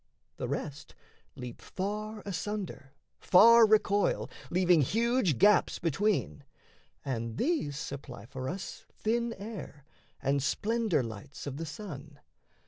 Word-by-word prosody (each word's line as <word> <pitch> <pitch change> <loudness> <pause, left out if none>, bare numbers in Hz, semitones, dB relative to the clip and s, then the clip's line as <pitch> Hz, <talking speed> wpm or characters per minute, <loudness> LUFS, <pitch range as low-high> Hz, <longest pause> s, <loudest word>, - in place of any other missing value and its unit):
The 125 - -3
rest 145 +2 -5 0.4
leap 125 -3 -8
far 210 +2 -4
asunder, 195 -7 -5 0.2
far 230 +4 +7
recoil, 210 -1 +2 0.2
Leaving 180 -2 +4
huge 225 - +2
gaps 210 - +4
between: 175 -1 0 0.6
and 115 -4 -3
these 265 - 0
supply 135 -7 -7
For 130 +1 -5
us 195 +2 -6
thin 235 +2 -1
air 200 -9 -8 0.3
and 140 +1 +1
splendour 215 - +1
lights 115 +5 -8
of 140 -1 -5
the 165 +1 -4
sun. 150 -5 -8
170 Hz, 115 wpm, -30 LUFS, 140-210 Hz, 0.6 s, far